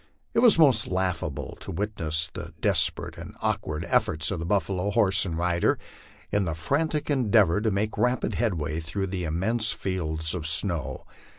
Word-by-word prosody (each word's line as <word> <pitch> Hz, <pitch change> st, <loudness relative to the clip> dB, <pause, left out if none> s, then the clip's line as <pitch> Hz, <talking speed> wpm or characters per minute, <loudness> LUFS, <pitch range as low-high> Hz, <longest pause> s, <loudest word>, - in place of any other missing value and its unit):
It -, -, +2 dB
was 235 Hz, -6 st, +6 dB
most 135 Hz, -9 st, +5 dB
laugh 90 Hz, -2 st, -1 dB
able -, -, -5 dB
to -, -, -7 dB
witness 85 Hz, -4 st, -1 dB
the -, -, -8 dB
desperate -, -, +1 dB
and -, -, -10 dB
awkward 75 Hz, +2 st, -2 dB
efforts 75 Hz, +1 st, 0 dB
of 85 Hz, 0 st, -3 dB
buffalo, 100 Hz, -1 st, 0 dB
horse, 95 Hz, -2 st, +5 dB
and 80 Hz, -2 st, -4 dB
rider, 85 Hz, 0 st, +1 dB, 0.5 s
in 100 Hz, -1 st, +1 dB
the 85 Hz, -2 st, -3 dB
frantic 150 Hz, -, -1 dB
endeavor 105 Hz, -, +3 dB
to 110 Hz, -, +1 dB
make 105 Hz, +2 st, -2 dB
rapid 125 Hz, 0 st, 0 dB
headway 80 Hz, -9 st, -1 dB
through 85 Hz, +5 st, -3 dB
the 90 Hz, -2 st, -2 dB
immense 105 Hz, +8 st, 0 dB
fields 80 Hz, -5 st, -2 dB
of 80 Hz, -3 st, -3 dB
snow. 85 Hz, -2 st, +1 dB
95 Hz, 165 wpm, -26 LUFS, 80-110 Hz, 0.5 s, was